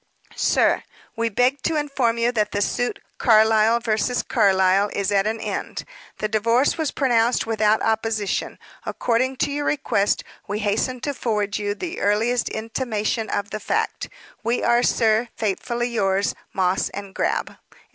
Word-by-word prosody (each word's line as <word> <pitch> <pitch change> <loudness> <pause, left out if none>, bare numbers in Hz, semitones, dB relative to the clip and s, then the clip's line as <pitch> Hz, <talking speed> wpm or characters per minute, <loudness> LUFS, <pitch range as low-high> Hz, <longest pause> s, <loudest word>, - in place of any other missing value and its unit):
"Sir - - +2 0.3
We 230 0 0
beg 250 +5 +1
to 325 - 0
inform 275 -6 0
you 235 +1 +2
that 210 -3 -1
the 205 - 0
suit 245 - -1 0.2
Carlyle 220 0 +4
vs. 230 +2 0
Carlyle, 195 -2 +3
is 200 0 -1
at 200 0 +2
an 225 +1 -2
end. - - -4 0.3
The 215 - -1
divorce 230 +5 +2
was 315 -3 -1
pronounced 240 -3 +2
without 220 -1 +2
opposition. 220 -2 -1 0.3
According 255 +2 0
to 285 - 0
your 290 0 -2
request, 205 -8 +1 0.2
we 205 - -2
hasten 220 +4 -1
to 285 - -2
forward 210 -5 -1
you 205 0 -2
the 345 +8 -5
earliest 225 +4 +1
intimation 225 -1 -2
of 205 +1 -2
the 215 - -3
fact. - - -2 0.3
"We 235 +2 0
are, 240 0 +4
sir, 225 -1 +2
faithfully 235 +3 -2
yours, 200 -3 +1 0.2
"MOSS 185 0 +1 0.2
& 195 - -15
GRAB. - - -2
225 Hz, 150 wpm, -22 LUFS, 210-245 Hz, 0.3 s, Carlyle